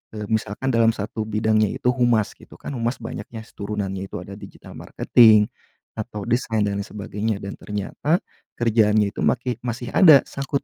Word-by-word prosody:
eee, 105 - -5
misalkan 110 +4 -1
dalam 115 -1 +4
1 110 +1 -4
bidangnya 110 0 +2
itu 125 - 0
humas 120 -4 +2
gitu. - - -16
Kan - - -8
humas 120 +2 -1
banyaknya 110 0 -8
turunannya 100 -2 -4
itu - - -10
ada - - -10
digital - - -13
marketing, 110 -3 +4 0.4
atau 105 -2 -6
design, 115 -2 0
dan 100 -1 -1
yang 100 - -5
sebagainya 105 +1 -3
dan 100 - -7
ternyata 105 - -2 0.3
kerjaannya 110 -3 +2
itu - - -10
makih 125 -1 0
masih 120 0 -5
ada 155 -8 +7
sangkut 140 0 -4
110 Hz, 165 wpm, -22 LUFS, 105-120 Hz, 0.4 s, ada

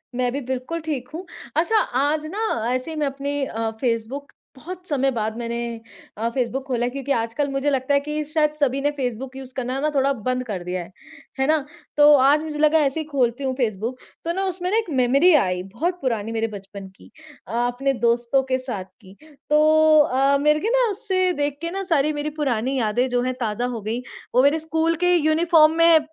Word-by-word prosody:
मैं 250 0 0
भी 280 - -2
बिल्कुल 260 +6 -4
ठीक 265 -6 -3
हूँ। 350 +4 -6 0.3
अच्छा 345 +8 +2
आज 290 +3 0
ना - - -3 0.3
ऐसे 255 +5 -3
ही 315 - -6
मैं 300 -1 +1
अपने 280 +1 -3
अ, 225 -2 -3
फ़ेसबुक 245 +4 -2 0.2
बहुत 360 +6 -9
समय 275 -2 +1
बाद 220 -2 -3
मैंने 235 0 -3 0.6
अ, 225 +2 -1
फ़ेसबुक 255 +2 -2
ख़ोला 245 -2 0
है - - 0
क्योंकि 275 +1 -4
आजकल 230 +6 -2
मुझे 275 +1 0
लगता 270 0 0
है 280 - +5
कि 300 +1 -3
शायद 305 -1 +2
सभी 275 -1 +1
ने 290 +1 +1
फ़ेसबुक 255 0 -4
यूज़ 260 -1 -9
करना 255 +1 -2
ना 305 +2 +1
थोड़ा 275 0 +3 0.2
बंद 255 0 0
कर 190 -5 -4
दिया 180 +1 -3
है। 175 - -14 0.5
हैं 265 - +2
ना? 305 -2 +2 0.3
तो 295 0 +8
आज 285 +3 +4
मुझे 305 -1 -5
लगा 310 +1 +4
ऐसे 275 +4 -1
ही 315 - -3
खोलती 250 -1 0
हूँ 265 -1 0
फ़ेसबुक, 235 0 -2 0.3
तो 335 - 0
ना 385 - -1
उसमें 365 -1 -2
ना 435 - +3
एक 450 -5 -1
मेमोरी 275 +8 +5
आई, 180 -8 +1
बहुत 325 - -3
पुरानी 225 -4 -2
मेरे 225 0 -1
बचपन 200 -1 -9
की, - - -17 0.4
अ, - - -9 0.2
अपने 270 +3 -1
दोस्तों 240 +3 +2
के - - +4
साथ 245 -8 -5 0.2
की। 190 -1 -15 0.3
तो 310 +1 +5
अ, 275 -1 +3
मेरे 300 +2 +3
को 425 - -1
ना - - +3
उससे 370 -2 0
देख 290 -2 -2
के 335 0 -3
ना 390 +1 -3
सारी 300 0 +2
मेरी 295 0 -3
पुरानी 260 -1 0
यादें 235 +3 +1
जो 245 0 +1
हैं, 255 +1 -1
ताज़ा 230 0 -1
हो 240 -3 -4
गई। 225 +4 -3 0.3
वो 250 - +6
मेरे 290 +3 +4
स्कूल 320 +1 0
के 355 0 +5
यूनिफ़ॉर्म 315 0 +4
में 330 -1 +7
275 Hz, 215 wpm, -22 LUFS, 245-305 Hz, 0.6 s, तो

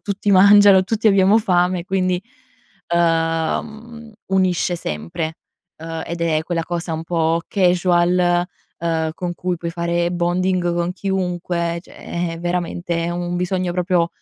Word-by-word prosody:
tutti 205 0 -2
mangiano, 200 0 +7
tutti 220 +2 -1
abbiamo 195 +1 +5
fame, 180 -3 +1
quindi, 185 -2 0 0.7
uhm, 165 -1 +1
mhmm, 230 +1 -12 0.2
unisce 185 -2 +1
sempre! 85 - -4 0.4
Uhm, 165 0 -6
ed 170 0 -5
è 160 -2 +1
quella 170 -1 -2
cosa 170 -1 -4
un 160 +1 -5
po' 165 -1 0
casual, 175 -1 +2 0.3
uhm, 160 -1 -1
con 175 -1 -4
cui 180 0 -2
puoi 170 0 -5
fare 170 0 -1
bonding 175 0 0
con 175 +1 -1
chiunque 180 -3 -2
cioè - - -17 0.4
è - - -9
veramente 175 -1 -2
un 175 0 -3
bisogno 180 0 -1
proprio 175 -1 +1
175 Hz, 135 wpm, -20 LUFS, 170-185 Hz, 0.7 s, mangiano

